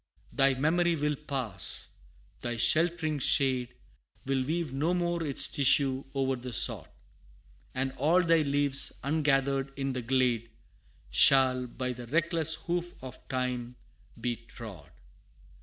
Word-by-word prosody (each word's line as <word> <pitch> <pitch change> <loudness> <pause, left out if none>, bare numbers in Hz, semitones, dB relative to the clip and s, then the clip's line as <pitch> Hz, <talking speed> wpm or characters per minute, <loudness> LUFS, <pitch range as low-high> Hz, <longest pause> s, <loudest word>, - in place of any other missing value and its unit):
Thy 135 0 +3
memory 170 +5 +1
will 150 -1 -1
pass; 135 -6 -3 0.5
thy 120 -1 -4
sheltering 155 +3 +1
shade, 130 -2 +2 0.5
Will 135 -1 0
weave 160 0 -3
no 155 +6 0
more 175 -1 -1
its 140 -4 +3
tissue 135 -1 +2
o'er 135 -1 0
the 125 0 -8
sod; - - +2 0.9
And 130 +1 -1
all 165 +7 +3
thy 165 -1 +3
leaves, 140 -1 0
ungathered 140 -2 0
in 135 -1 -2
the 125 - -3
glade, 120 -2 0 0.6
Shall, 130 - +5
by 125 +1 -4
the 120 0 -10
reckless 160 +2 +1
hoof 175 -1 -4
of 130 -1 -11
time, 125 -2 -3 0.4
be 120 0 -2
trod. 110 - -11
135 Hz, 125 wpm, -29 LUFS, 125-155 Hz, 0.9 s, Shall